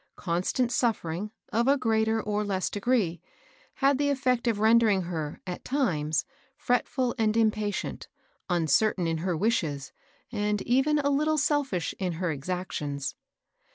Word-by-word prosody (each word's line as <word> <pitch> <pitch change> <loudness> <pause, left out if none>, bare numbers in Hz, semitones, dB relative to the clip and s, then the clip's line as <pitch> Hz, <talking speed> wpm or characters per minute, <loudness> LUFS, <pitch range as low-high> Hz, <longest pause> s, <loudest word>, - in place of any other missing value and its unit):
Constant 185 +8 0
suffering, 210 -6 -1 0.2
of 235 +3 +2
a 280 +1 +5
greater 225 -3 +1
or 210 -1 -1
less 195 -2 -1
degree, 200 -6 0 0.5
had 275 0 +2
the 285 0 +2
effect 255 -3 +1
of 225 -3 +2
rendering 220 -3 +4
her, 160 -4 -4
at 180 -1 -6
times, 160 - 0 0.3
fretful 250 -2 0
and 220 0 +2
impatient, 215 -2 0 0.4
uncertain 175 +3 +2
in 165 -1 -1
her 175 0 -1
wishes, 155 - 0 0.4
and 210 -2 -1
even 270 +5 +2
a 295 - 0
httle 300 +2 +2
selfish 280 - 0
in 185 -3 -1
her 170 +1 -1
exactions. 150 -3 -3
210 Hz, 135 wpm, -28 LUFS, 175-250 Hz, 0.5 s, a